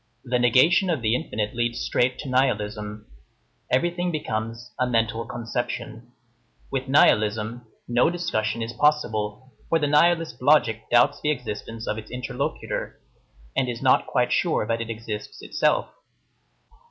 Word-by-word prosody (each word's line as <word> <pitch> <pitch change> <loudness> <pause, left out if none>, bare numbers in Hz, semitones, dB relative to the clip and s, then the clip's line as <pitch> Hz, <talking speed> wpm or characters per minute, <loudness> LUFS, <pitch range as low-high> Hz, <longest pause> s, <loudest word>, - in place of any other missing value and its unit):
The 125 -1 0
negation 155 - +4
of 155 -8 -1
the 110 0 +2
infinite 105 -4 -3
leads 120 0 -1
straight 125 +1 +1
to 145 - -8
nihilism. 105 -5 -1 0.7
Everything 175 +6 +1
becomes 115 -4 -4
"a 125 - +2
mental 115 -1 0
conception." 120 0 -5 0.6
With 135 -1 -2
nihilism, 110 -3 +2 0.2
no 120 +5 +3
discussion 115 -11 -1
is 115 +1 -5
possible; 125 -4 0 0.2
for 165 - +4
the 150 - 0
nihilist 160 -2 +2
logic 115 -6 +3
doubts 120 0 +4
the 150 - 0
existence 115 -4 -4
of 110 - -2
its 110 - -11
interlocutor, 125 +2 -4 0.6
and 130 - +1
is 120 -1 -5
not - - +4
quite - - +1
sure - - +1
that 115 +1 -1
it 115 - -5
exists 110 -1 -6
itself. - - +1
120 Hz, 140 wpm, -24 LUFS, 110-135 Hz, 0.7 s, negation